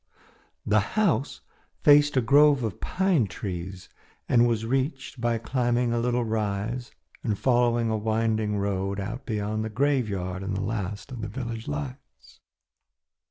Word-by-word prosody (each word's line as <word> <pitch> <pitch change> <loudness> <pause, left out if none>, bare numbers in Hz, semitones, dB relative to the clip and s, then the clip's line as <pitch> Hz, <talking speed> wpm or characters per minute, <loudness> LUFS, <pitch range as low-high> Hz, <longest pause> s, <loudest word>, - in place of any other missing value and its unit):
The 110 +1 +4 0.2
house 160 - +1 0.4
faced 145 -1 +6
a - - +5
grove 140 +2 +5
of 110 -5 -4
pine 180 - +1
trees 95 -1 -6 0.4
and 120 0 +4
was 115 -2 0
reached 135 +1 -2
by 120 -1 +1
climbing 120 +1 0
a 120 - +1
little 120 +1 +1
rise 110 +2 -2 0.3
and 105 -4 -1
following 120 -2 +2
a 110 - +1
winding 110 -1 0
road 100 0 -1
out 115 +7 -5
beyond 110 -1 -2
the 110 - -3
graveyard 105 -8 0
and 95 0 -3
the - - -2
last 100 -1 -4
of 125 -3 -6
the 110 - -3
village 115 0 -5
lights. 75 -3 -7
115 Hz, 145 wpm, -26 LUFS, 100-125 Hz, 0.4 s, faced